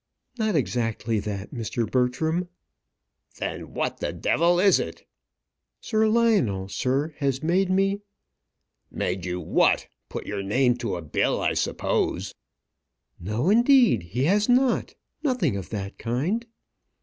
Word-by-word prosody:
"Not 220 -3 +1
exactly 115 -5 0
that, 100 +1 -5
Mr. 115 -1 -2
Bertram." 145 - 0 0.9
"Then - - -5
what - - -2
the - - -2
d - - -4
is 175 +3 +4
it?" 80 - -6 0.7
"Sir 220 0 +1
Lionel, 205 - +2
sir, 135 +9 -1
has 140 -1 -1
made 180 +4 +2
me 195 +2 +1 0.5
" - - -55 0.3
"Made 90 0 -2
you 90 0 -3
what? - - +2 0.2
Put - - -6
your 100 -1 -3
name 125 +5 +2
to 115 -6 -3
a 85 - -6
bill, 75 - 0
I - - +1
suppose." - - -1 0.9
"No; 110 - 0
indeed 240 - +5
he 115 +10 -3
has 205 - +2
not. 250 +1 +2 0.3
Nothing 250 - +1
of 95 -3 -5
that 100 -2 -5
kind." 160 - -1
135 Hz, 135 wpm, -25 LUFS, -, 0.9 s, indeed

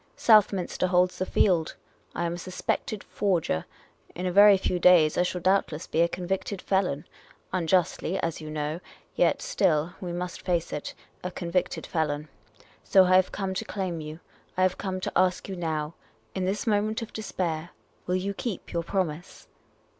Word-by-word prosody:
Southminster 200 -5 +3
holds 180 0 +2
the 185 - -1
field. 170 -5 +2 0.4
I 170 - -1
am 170 - -1
a - - -5
suspected 185 +3 -3
forger; 170 - 0 0.5
in 180 - -4
a 180 - 0
very 200 +1 +8
few 180 -1 -1
days 170 -3 +6
I - - +2
shall 180 0 -1
doubtless 185 -4 +1
be 165 - 0
a 170 - +5
convicted 185 +3 -3
felon. 180 -8 0 0.5
Unjustly, 180 +1 +1
as 165 -1 -2
you 155 - -7
know; 155 +1 -3 0.4
yet - - +2
still 175 - +1
— - - -26
we 180 -2 -4
must 180 +1 -5
face 175 -2 -1
it 150 - -5
— - - -36
a 180 - -2
convicted 175 0 -2
felon. 150 -2 -2 0.5
So 190 - +6
I 185 0 +4
have 185 0 +4
come 195 -2 -3
to 195 - -2
claim 185 -6 -3
you. 155 +1 -8 0.4
I 185 - +3
have 185 0 +1
come 185 -1 -3
to - - -2
ask 185 0 +2
you 195 - -5
now, 160 -3 -2 0.4
in 185 - -2
this 195 +3 -1
moment 215 0 +1
of 225 - -10
despair, 175 -6 -3 0.4
will 180 - +1
you 195 +2 -1
keep 205 -1 -5
your 170 - 0
promise 175 -1 -3
180 Hz, 180 wpm, -27 LUFS, 165-190 Hz, 0.5 s, very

